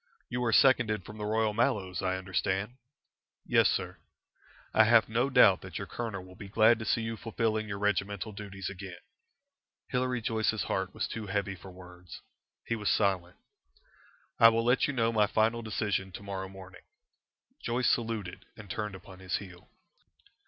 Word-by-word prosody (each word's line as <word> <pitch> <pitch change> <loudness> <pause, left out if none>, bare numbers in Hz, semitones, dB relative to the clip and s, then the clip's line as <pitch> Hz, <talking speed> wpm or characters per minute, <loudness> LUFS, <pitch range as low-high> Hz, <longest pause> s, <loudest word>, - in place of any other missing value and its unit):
You 125 0 -2
are 115 - +2
seconded 110 -6 +4
from 105 +1 -10
the 105 - -3
Royal 110 0 +1
Mallows, 95 -5 0
I 95 -1 0
understand?" 95 +4 -2 0.7
"Yes, - - +4
sir." - - -2 0.8
"I 110 - +6
have 115 0 +5
no 120 +5 +1
doubt 100 -7 +6
that - - -7
your - - -4
colonel 110 -6 -5
will 90 0 -14
be 100 +1 -10
glad 110 +2 +5
to 110 - -5
see 115 - +1
you 115 0 -3
fulfilling 110 -1 -1
your 100 -1 -4
regimental 105 +1 -1
duties 100 -2 -7
again." 95 -1 -7 0.9
Hilary 125 0 0
Joyce's 110 -1 0
heart 95 -1 -2
was - - -1
too 110 -2 -6
heavy 100 0 -1
for 95 +1 -12
words. 90 0 -12 0.5
He 115 - -1
was 105 -2 -1
silent. 95 -4 +1 1.0
"I 115 - +9
will 115 0 0
let 125 +2 +3
you 145 - -2
know 115 -3 +1
my 105 -2 +3
final 110 +2 +1
decision 105 -3 -2
to 100 - -8
morrow 95 -1 -5
morning." 95 -1 -12 0.8
Joyce 120 +1 +1
saluted 110 -6 -3
and 100 -4 -9
turned 105 -1 -3
upon 95 0 -13
his 95 0 -3
heel." 90 -3 -8
105 Hz, 170 wpm, -30 LUFS, 95-115 Hz, 1.0 s, I